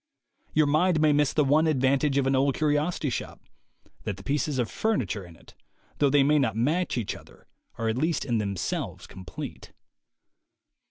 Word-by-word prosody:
Your 155 0 +5
mind 155 +4 +2
may 155 -1 +4
miss 145 -1 +2
the 150 - +2
one 155 +4 +3
advantage 140 0 +2
of 140 - +2
an 135 0 +2
old 135 0 +2
curiosity 150 -1 0
shop - - -5 0.3
— - - -31
that 100 - -4
the 95 - -12
pieces 145 +1 -1
of 120 -3 +1
furniture 120 - -1
in 85 -2 -13
it, - - -19 0.5
though 145 - +4
they 140 0 +4
may 150 +2 +4
not 115 -7 0
match 150 +8 0
each 115 -5 -2
other, - - -16 0.3
are 115 - -2
at 110 +3 0
least 160 +1 0
in 120 -4 0
themselves 100 -4 -3
complete. 95 0 -9
140 Hz, 180 wpm, -27 LUFS, 120-150 Hz, 0.5 s, Your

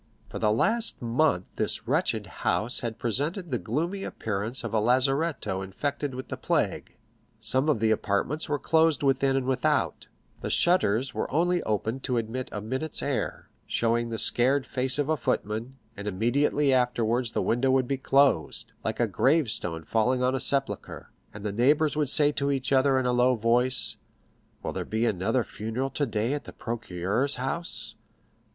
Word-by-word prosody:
For - - -6
the 105 -1 +2
last 225 - +1
month 120 - +1
this - - -1
wretched - - 0 0.2
house 115 +4 0
had 115 -2 -4
presented 150 - -1
the 125 - 0
gloomy 170 - -2
appearance 110 +4 -2
of - - -5
a 110 - +3
lazaretto 130 - +1
infected 140 +8 -3
with 130 - -7
the - - -4
plague. - - -1 0.4
Some 135 +4 +1
of 145 - +2
the 110 0 +2
apartments 110 +9 0
were 145 - +1
closed 160 0 +2
within 135 0 +2
and 135 -1 0
without; 130 -1 0 0.3
the - - -3
shutters 135 - +3
were - - -2
only 175 +3 +1
opened 110 +4 -2
to 125 -2 0
admit 115 +3 -3
a 105 - -4
minute's 130 +8 -3
air, - - -3 0.2
showing 115 0 0
the 115 - -3
scared 130 +5 +3
face 130 +1 0
of 145 -1 0
a 155 - +2
footman, 115 0 -2 0.2
and 100 +1 -7
immediately 135 +7 +2
afterwards 120 -1 +1
the - - 0
window 120 +3 +1
would 130 -1 +3
be 135 - -1
closed, 135 - +2
like - - -3
a - - +4
gravestone 110 - +1
falling 125 - +1
on 130 +1 +2
a 135 - 0
sepulchre, 135 +1 -2 0.2
and 100 +1 -9
the 105 - -1
neighbors 145 +8 +3
would 150 -3 0
say 145 0 +3
to 140 -1 -1
each 135 -1 0
other 135 0 +4
in 130 - 0
a 125 - +2
low 125 +1 +4
voice, 120 +3 +2 0.7
"Will - - -3
there - - -3
be 110 +2 -1
another 110 +4 +1
funeral 115 +6 -4
today 115 -3 -1
at 145 - -4
the - - -10
procureur's 115 +3 -2
house?" 135 +7 -2
130 Hz, 170 wpm, -27 LUFS, 110-140 Hz, 0.7 s, a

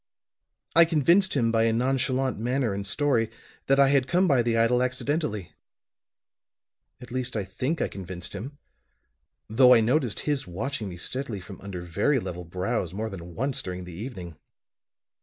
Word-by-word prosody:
I 170 - +9
convinced 170 +4 +3
him 115 -4 +2
by 115 0 +3
a 115 - +3
nonchalant 130 +1 0
manner 125 -1 0
and 100 0 -4
story, 125 -4 +2 0.4
that 135 +1 +4
I 135 -1 +6
had 135 -2 +3
come 180 +5 +3
by 135 -6 +4
the 115 -1 +1
idol 120 +2 +3
accidentally. 125 - -2 1.5
At 125 0 -12
least 125 -2 -3
I 105 - -1
think 130 - -2
I - - 0
convinced 90 -2 -7
him, 130 +9 -7 0.9
though 125 +3 +6
I - - +6
noticed 120 +1 +1
his 145 -7 -1
watching 110 +4 -4
me 90 - -8
steadily 125 +2 -3
from 90 - -11
under 95 -3 -6
very 100 - +1
level 90 -5 -6
brows 90 +1 -2
more 110 +2 -3
than 90 -2 -9
once 135 +2 -1
during 90 0 -6
the 90 -1 -9
evening. 90 - -8
120 Hz, 165 wpm, -26 LUFS, 95-135 Hz, 1.5 s, I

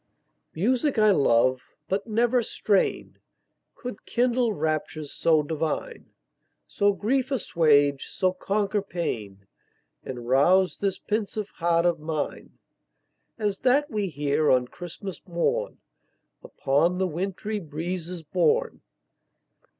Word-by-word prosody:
Music 250 - +1
I 215 -1 +5
love 130 -5 +3 0.3
but 195 +3 -2
never 240 +3 +2
strain 205 -3 0 0.6
Could 245 -5 -8
kindle 245 -1 +1
raptures 155 -3 -3
so 160 -2 +3
divine, 160 - -3 0.6
So 205 0 +2
grief 255 +6 0
assuage, 145 - +2
so 185 -1 0
conquer 200 +2 -1
pain, 110 - -5 0.6
And 120 -2 -7
rouse 175 +7 +3
this 195 -2 -1
pensive 210 0 -3
heart 170 0 +1
of 170 -2 +2
mine 155 -1 -4 0.8
As 205 -3 -1
that 280 +4 +2
we 210 -2 -1
hear 150 -1 0
on 125 -1 +3
Christmas 175 +2 -8
morn, 185 - -1 0.7
Upon 155 +6 +1
the 190 - +1
wintry 195 +5 -3
breezes 170 +1 -5
borne. 450 - +1
180 Hz, 110 wpm, -26 LUFS, 155-215 Hz, 0.8 s, I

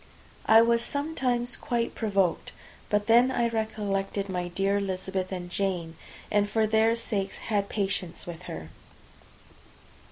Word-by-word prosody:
I 225 +1 +8
was 235 0 +3
sometimes 255 -5 -1
quite 235 -2 -2
provoked; 195 -6 0 0.4
but 205 0 +1
then 235 +3 +6
I 240 -2 +1
recollected 205 -3 -2
my 180 -1 -2
dear 195 +3 +1
Elizabeth 190 -1 -3
and 180 -2 -4
Jane, 175 -3 -2 0.4
and 205 0 +2
for 220 +1 +2
their 220 +1 +3
sakes 205 -4 -2 0.2
had 200 -1 +1
patience 195 -4 -2
with 175 -1 -7
her. 80 0 -7
205 Hz, 130 wpm, -27 LUFS, 190-230 Hz, 0.4 s, I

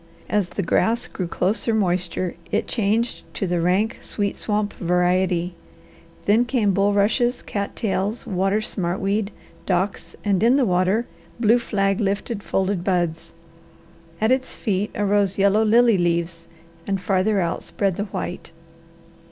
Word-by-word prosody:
As 205 -4 +1
the 200 - -3
grass 230 +7 +1
drew 185 -7 -4
closer 215 +6 0
moisture 180 -3 0 0.2
it - - +1
changed 225 +2 0
to 195 - -1
the 175 -2 0
rank, 190 +6 +1
sweet, 205 -2 -2
swamp 210 -1 -1
variety, 180 0 +1 0.7
then 215 +4 +4
came 240 -5 +1
bulrushes, 205 +5 +2
cat 200 -1 -4
tails, 205 +1 -2
water 195 +2 0
smartweed, 195 +1 -1 0.4
docks, 190 +2 -1
and 195 -3 +2
in 240 +4 +5
the 270 - +3
water 185 +4 +2 0.3
blue 235 +1 +4
flag 195 -4 0
lifted 200 +2 -1
folded 190 -2 -1
buds; 175 -4 -1 0.9
at 220 +2 +2
its 260 0 0
feet 205 -2 -1
arose 205 -1 +1
yellow 200 +2 +4
lily 230 -1 +4
leaves 170 -1 -1 0.4
and 195 -1 0
farther 195 +2 +1
out 170 -1 -1
spread 195 -3 -1
the 205 - -2
white. 180 -4 -5
200 Hz, 135 wpm, -22 LUFS, 180-215 Hz, 0.9 s, in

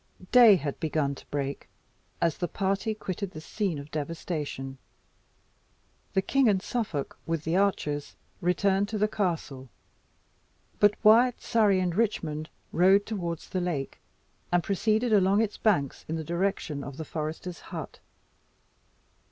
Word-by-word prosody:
Day 235 -5 +9
had 145 -5 -3
begun 155 -3 0
to - - -13
break 140 -1 -4 0.5
as 165 -3 +1
the 175 - 0
party 195 +4 -1
quitted 195 -1 -4
the 155 - -9
scene 185 +1 -2
of 140 +1 -9
devastation. 150 -3 -4 1.4
The 190 - +3
king 270 +2 +3
and 195 -2 +3
Suffolk, 185 - -3
with 165 -2 -1
the 160 +2 0
archers, 150 -7 0 0.3
returned 195 +3 +2
to 220 - -2
the 210 +1 +2
castle; 165 - -3 1.1
but 205 0 +5
Wyat, 230 +3 +6
Surrey, 210 -4 +3
and 180 -2 0
Richmond 165 -7 -1 0.2
rode 190 +4 +5
towards 175 -7 -4
the 185 - -1
lake, 160 -7 -3 0.5
and 175 -1 +3
proceeded 215 +4 +1
along 195 0 +4
its 210 -2 -3
banks 145 -11 +1
in 160 - -2
the 160 - -3
direction 170 -4 -2
of 140 -1 -8
the 160 - -5
forester's 160 +3 -5
hut. - - -8
180 Hz, 140 wpm, -28 LUFS, 155-205 Hz, 1.4 s, Day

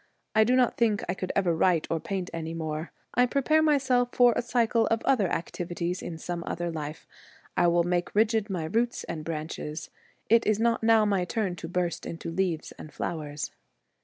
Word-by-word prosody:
I 220 -1 +6
do 245 +4 +3
not 255 -2 +3
think 220 -4 +2
I 175 - 0
could 185 -1 -4
ever 180 -4 +2
write 165 -1 +3
or 165 - +1
paint 185 +1 -4
any 165 0 -4
more. 155 0 -4 0.2
I 250 0 +4
prepare 285 +4 +3
myself 265 -5 +3
for 245 -1 +6
a - - +1
cycle 235 -1 +2
of 225 0 0
other 230 -8 +3
activities 175 +1 -3
in 165 - -6
some 170 +1 -4
other 175 0 -2
life. 155 0 -6 0.5
I 175 - +4
will 170 0 +3
make 175 +1 -1
rigid 220 0 +2
my 180 -4 -2
roots 230 +8 0
and 155 -2 -5
branches. 155 -1 -5 0.4
It 230 +1 +4
is 215 0 +2
not 230 0 +2
now 225 -1 +5
my 200 -3 +1
turn 190 -1 -1
to 165 - -6
burst 175 -1 -2
into 165 0 -5
leaves 170 -2 -1
and 155 - -9
flowers.' 150 -2 -4
180 Hz, 190 wpm, -28 LUFS, 165-230 Hz, 0.5 s, I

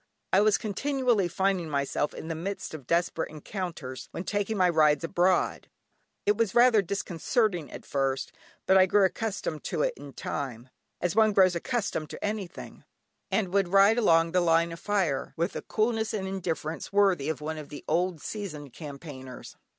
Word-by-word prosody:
I 190 - +6
was 210 -1 +4
continually 240 -2 0
finding 190 -1 0
myself 140 0 -1
in - - -7
the 165 - -2
midst 185 +4 -5
of 140 -5 -9
desperate 170 -1 0
encounters 155 -5 -6
when 170 - -5
taking 205 +2 -1
my 185 -1 +4
rides 155 -3 +3
abroad. 175 +2 +1 0.6
It 205 - +3
was 225 -3 0
rather 240 -3 +6
disconcerting 195 - -1
at - - -9
first, 135 -1 -1 0.3
but 190 0 +6
I 185 - +6
grew 200 +1 +4
accustomed 190 -6 -3
to 160 -4 -1
it - - +1
in 140 -1 -11
time, 125 -3 -5 0.3
as 180 0 0
one 220 -1 +5
grows 185 -2 +5
accustomed 195 - -2
to - - -5
anything, 205 -3 -5 0.5
and 190 -4 0
would 200 -2 +3
ride 200 +5 +5
along 165 -6 +4
the 180 +1 +3
line 165 0 +3
of 165 - -7
fire, 190 -10 -1
with 170 +2 -1
a - - -3
coolness 220 0 0
and 190 -2 -3
indifference 170 -4 -4
worthy 195 -8 +3
of 155 -5 -2
one 155 +1 -4
of 150 - -9
the 145 - -9
old 170 0 0
seasoned 155 - -6
campaigners. 140 -4 -9
180 Hz, 175 wpm, -28 LUFS, 155-205 Hz, 0.6 s, I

